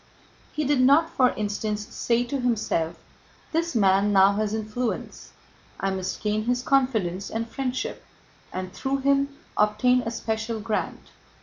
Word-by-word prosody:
He 305 - -2
did 285 -2 +2
not, 290 +6 +5
for 255 -2 +4
instance, 210 0 -2
say 235 0 +1
to 270 +3 -3
himself: 220 -9 0 0.6
"This 335 -1 -1
man 200 -1 +4
now 195 0 +6
has 210 0 -1
influence, 220 +3 -4 0.5
I 195 - 0
must 190 -1 -4
gain 215 0 0
his 245 +1 0
confidence 220 -10 +1
and 225 +1 -3
friendship 260 +1 -3 0.5
and 185 0 -5
through 270 0 -2
him 280 +1 +1 0.2
obtain 215 +4 +3
a 230 - -3
special 220 0 -3
grant." 215 0 -3
225 Hz, 140 wpm, -25 LUFS, 210-255 Hz, 0.6 s, now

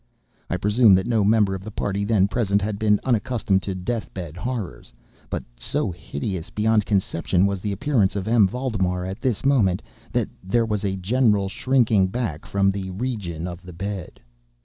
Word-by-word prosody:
I 90 - 0
presume 105 +2 +5
that 95 - +1
no 115 -3 +2
member 105 -1 +3
of 95 -1 -5
the 110 - -6
party 100 -1 -2
then 100 -3 +3
present 100 -2 +1
had 100 0 -3
been 105 -2 +3
unaccustomed 110 -5 +1
to 95 -1 -4
death 110 +5 -3
bed 85 -5 -6
horrors; 95 - -5 0.4
but - - -3
so - - -2
hideous 85 +1 -5
beyond 105 -1 +1
conception 95 -2 +1
was 100 -2 -1
the 105 - -2
appearance 110 -3 +1
of 100 0 -3
M. 110 -3 +5
Valdemar 95 -6 -1
at 95 +1 -6
this 130 -2 -1
moment, 105 -10 +3 0.3
that - - 0 0.2
there 115 +5 +2
was 105 -2 -2
a 95 -1 0
general 105 +1 +2
shrinking 115 -5 +2
back 95 -8 -4
from 100 0 +2
the 95 -1 -4
region 95 -6 -4
of 90 0 -7
the 90 -1 -11
bed. 100 +1 -5
100 Hz, 180 wpm, -23 LUFS, 95-110 Hz, 0.4 s, presume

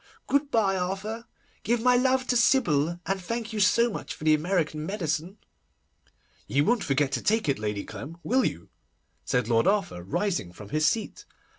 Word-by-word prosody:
Good 280 0 +1
bye, 200 -7 +2
Arthur, 195 +5 -4 0.3
give 235 +3 +1
my 250 +2 +4
love 260 +1 +2
to 245 - +2
Sybil, 175 - +2
and 195 +1 -1
thank 230 +3 -4
you 215 - -2
so 235 +4 +4
much - - -6
for - - -12
the 155 0 +5
American 155 -1 0
medicine.' 170 0 -3 1.1
'You 140 +2 +2
won't 240 +1 +2
forget 140 0 +1
to 130 - -1
take 220 -2 +1
it, 140 -6 +1
Lady 105 -1 -3
Clem, 160 +4 -9
will 255 - +2
you?' 85 0 -3 0.6
said 125 -3 0
Lord 115 +7 +2
Arthur, 195 - 0
rising 100 - -2
from 100 +2 -11
his 155 +5 +2
seat. 220 +4 -2
185 Hz, 175 wpm, -27 LUFS, 145-225 Hz, 1.1 s, the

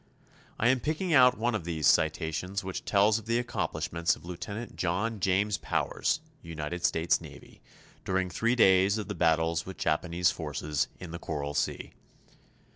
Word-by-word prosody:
I 115 - +3
am 130 0 +3
picking 160 +6 -1
out 125 -2 +6
one 120 +2 0
of 110 - -2
these 80 -3 -2
citations 80 +6 +1
which 95 0 -5
tells 105 +2 +3
of 110 - -15
the 115 +1 +2
accomplishments 85 -7 -1
of - - -16
Lieutenant 100 +6 -6
John 100 +6 -1
James 100 +3 +1
Powers, - - -1 0.2
United 85 +1 -5
States 80 0 +2
Navy, - - -13 0.4
during 95 0 0
three 115 +7 +1
days 95 -2 +5
of 105 -3 -4
the - - -2
battles 80 0 +1
with 95 - -7
Japanese 85 +3 +1
forces 75 -2 -2
in 90 -3 -8
the 85 - -6
Coral 75 -3 -4
Sea. - - -2
90 Hz, 160 wpm, -29 LUFS, 80-110 Hz, 0.4 s, out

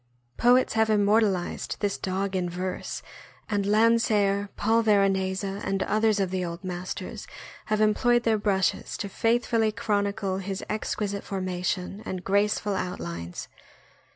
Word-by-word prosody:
Poets 250 +2 +4
have 220 0 +2
immortalized 205 -3 +1
this 205 -2 0
dog 190 +1 -2
in 180 -1 0
verse, 180 +1 -4 0.4
and 200 -2 -1
Land 230 +2 +4
seer, 200 -3 +1
Paul 225 +2 +2
Veronese, 195 -3 +2
and 195 0 -2
others 215 0 +2
of 190 -2 0
the 185 -1 -1
old 170 +2 -5
masters 180 0 -5 0.4
have 215 0 0
employed 240 +3 +3
their 220 -2 +2
brushes 195 -2 0
to 205 - -3
faithfully 225 +1 +1
chronicle 200 -2 -1
his 195 0 -4
exquisite 205 -2 -2
formation 185 +1 -3
and 185 -1 -5
graceful 205 +1 +1
outlines. 85 - -5
200 Hz, 130 wpm, -26 LUFS, 190-215 Hz, 0.4 s, Poets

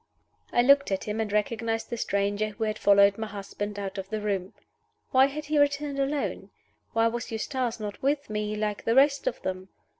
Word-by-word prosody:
I 240 - +4
looked 280 -1 +5
at 190 - -1
him, 210 +1 -3
and 215 -2 -3
recognized 225 +2 -1
the - - -1
stranger 205 -1 0
who 215 +2 -5
had 215 0 -2
followed 200 0 +5
my 220 - -3
husband 205 0 -6
out 195 -1 -4
of 190 0 -7
the 215 - -2
room. 200 -3 -2 0.6
Why 265 +1 +6
had 295 +2 -6
he 300 0 +1
returned 285 0 +1
alone? 275 +1 -2 0.4
Why 225 0 +3
was 235 +1 -4
Eustace 235 +1 -2
not 210 -1 -6
with 285 +1 0
me, 210 0 -2
like 210 -1 -3
the 230 - +2
rest 280 - +4
of - - -1
them? 185 0 -4
220 Hz, 200 wpm, -27 LUFS, 205-270 Hz, 0.6 s, Why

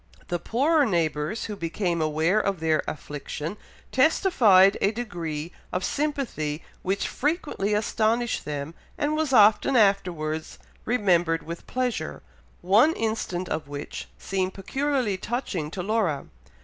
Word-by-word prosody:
The 175 - -1
poorer 290 - +2
neighbours, 170 - 0
who 210 - -5
became 170 -1 -1
aware 160 +6 +2
of 200 -4 -1
their 160 -1 +2
affliction, 150 +3 -5 0.4
testified 240 - +5
a 200 - +4
degree 175 -8 -4 0.2
of 180 - -2
sympathy 255 - -2 0.2
which 195 +2 -1
frequently 290 - -1
astonished 225 +2 0
them, 145 +1 -4 0.2
and 300 +1 0
was 310 -3 0
often 220 +3 +5
afterwards 175 -8 +1 0.3
remembered 175 -8 +2
with 170 +1 -8
pleasure, 250 -2 -2 0.4
one 215 - +5
instance 215 - -2
of 155 -2 -3
which 145 0 -6
seemed 190 -1 -2
peculiarly 260 0 -1
touching 190 - -3
to 180 +2 -5
Laura. 195 -9 0
195 Hz, 125 wpm, -26 LUFS, 165-240 Hz, 0.4 s, testified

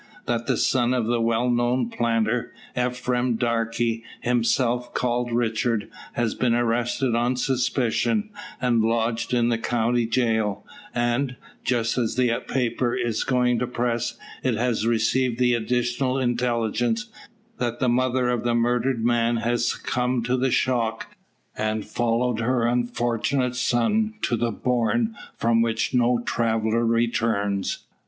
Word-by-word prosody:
That 115 -1 -1
the - - +1
son 125 -1 +2
of 120 -3 0
a 120 -1 +1
well 115 +2 +1
known 120 0 +1
planter, 115 0 0 0.2
Ephraim 125 0 0
Darke, 115 -1 -1 0.5
himself 120 0 +1
called 120 0 0
Richard, 115 -2 0 0.2
has 120 -2 0
been 120 -2 +1
arrested 120 +2 0
on 120 +2 +1
suspicion, 130 - 0 0.3
and 120 -3 +2
lodged 115 +1 0
in 120 -1 +2
the 115 -1 0
county 120 0 +1
jail; 110 -4 0 0.3
and, 120 +2 0 0.3
just 120 0 0
as 115 -2 -1
the 125 -1 +2 0.2
paper 120 -1 0
is 115 -2 -1
going 125 -2 +2
to 125 - -1
press, 120 -1 -2 0.2
it 130 -3 +1
has 115 -1 0
received 120 +2 +1
the 125 -1 +3
additional 125 +3 0
intelligence, 120 -2 0 0.5
that 120 -1 -2
the 130 - +1
mother 125 +1 +2
of 120 -1 0
the 120 -1 +1
murdered 120 0 +1
man 120 0 +2
has 120 +1 0
succumbed 125 -1 -1
to 125 +1 +1
the 130 +1 +1
shock, 115 -3 0 0.4
and 110 0 -2
followed 120 0 0
her 120 0 +1
unfortunate 120 +1 0
son 210 - +1
to 120 - +1
the 120 +1 0
"bourne 125 - 0 0.2
from 115 0 +2
which 115 +1 0
no 125 -1 +3
traveller 115 0 +1
returns." 115 -4 0
120 Hz, 135 wpm, -24 LUFS, 115-125 Hz, 0.5 s, the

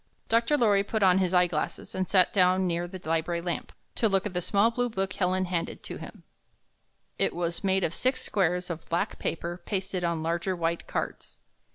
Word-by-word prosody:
Dr. 230 +6 +3
Lorry 205 -6 +4
put 215 +1 -1
on 185 0 +5
his 185 -2 +1
eye 180 -1 +5
glasses 160 -3 -3
and 185 -1 -2
sat 185 -2 +4
down 185 -1 +4
near 175 0 -1
the 185 +1 -8
library 165 +1 0
lamp, 175 0 -4 0.2
to 225 - +2
look 195 0 +1
at 205 - -3
the 180 - -1
small 205 +5 +3
blue 245 +1 0
book 195 -3 -2
Helen 185 0 +1
handed 175 -2 -3
to - - -6
him. - - -10 1.0
It - - +2
was 170 +1 -2
made 190 -1 +2
of 160 - 0
six 255 +7 0
squares 180 -2 0
of 165 -1 -7
black 170 - -1
paper 170 +2 -3
pasted 190 -2 -2
on 170 -2 0
larger 170 +3 -1
white 170 0 -2
cards. - - -4
185 Hz, 200 wpm, -28 LUFS, 170-195 Hz, 1.0 s, on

